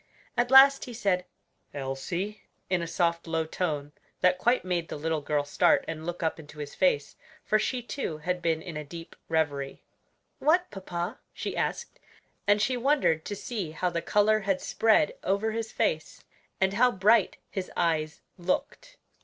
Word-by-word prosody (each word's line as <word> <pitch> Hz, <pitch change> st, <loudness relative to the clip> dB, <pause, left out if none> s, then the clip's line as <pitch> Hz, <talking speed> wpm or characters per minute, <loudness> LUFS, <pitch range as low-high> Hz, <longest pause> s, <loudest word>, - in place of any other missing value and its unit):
At 240 Hz, 0 st, +1 dB
last 270 Hz, +1 st, +8 dB
he 245 Hz, -, -8 dB
said, 195 Hz, -5 st, 0 dB, 0.5 s
"Elsie!" 145 Hz, +10 st, -4 dB, 0.3 s
in 180 Hz, -2 st, +2 dB
a 170 Hz, -, -3 dB
soft, 170 Hz, 0 st, 0 dB
low 160 Hz, -1 st, 0 dB
tone 150 Hz, -4 st, -2 dB, 0.3 s
that 180 Hz, 0 st, +4 dB
quite 240 Hz, -4 st, +2 dB
made 175 Hz, -3 st, -1 dB
the -, -, -4 dB
little 160 Hz, +1 st, -1 dB
girl 145 Hz, 0 st, 0 dB
start 145 Hz, -, +3 dB
and 160 Hz, 0 st, -5 dB
look 175 Hz, 0 st, -4 dB
up 160 Hz, 0 st, 0 dB
into 150 Hz, -1 st, -12 dB
his 145 Hz, -1 st, -6 dB
face; 145 Hz, -6 st, +1 dB, 0.3 s
for 215 Hz, -, +3 dB
she, 245 Hz, +3 st, -1 dB
too, 235 Hz, -, -4 dB
had 180 Hz, +3 st, -2 dB
been 160 Hz, -2 st, 0 dB
in 170 Hz, -, -7 dB
a 150 Hz, -, -4 dB
deep 165 Hz, +3 st, -10 dB
reverie. 145 Hz, -4 st, -1 dB, 0.6 s
"What, 355 Hz, +4 st, +3 dB
papa?" 185 Hz, +2 st, -4 dB
she -, -, -4 dB
asked, -, -, -3 dB, 0.5 s
and 205 Hz, 0 st, +5 dB
she 250 Hz, +5 st, +1 dB
wondered 245 Hz, -, +2 dB
to 205 Hz, -, -4 dB
see 200 Hz, -5 st, -4 dB
how 180 Hz, +3 st, -1 dB
the 170 Hz, -1 st, -1 dB
color 210 Hz, +4 st, +3 dB
had 195 Hz, -2 st, 0 dB
spread 220 Hz, -2 st, +3 dB
over 200 Hz, +3 st, +1 dB
his 225 Hz, 0 st, -3 dB
face, 155 Hz, -1 st, -1 dB, 0.4 s
and 190 Hz, 0 st, +2 dB
how 250 Hz, +4 st, +4 dB
bright 210 Hz, +3 st, +3 dB
his 190 Hz, -3 st, -4 dB
eyes 160 Hz, -3 st, 0 dB, 0.2 s
looked. -, -, -3 dB
180 Hz, 170 wpm, -28 LUFS, 160-215 Hz, 0.6 s, last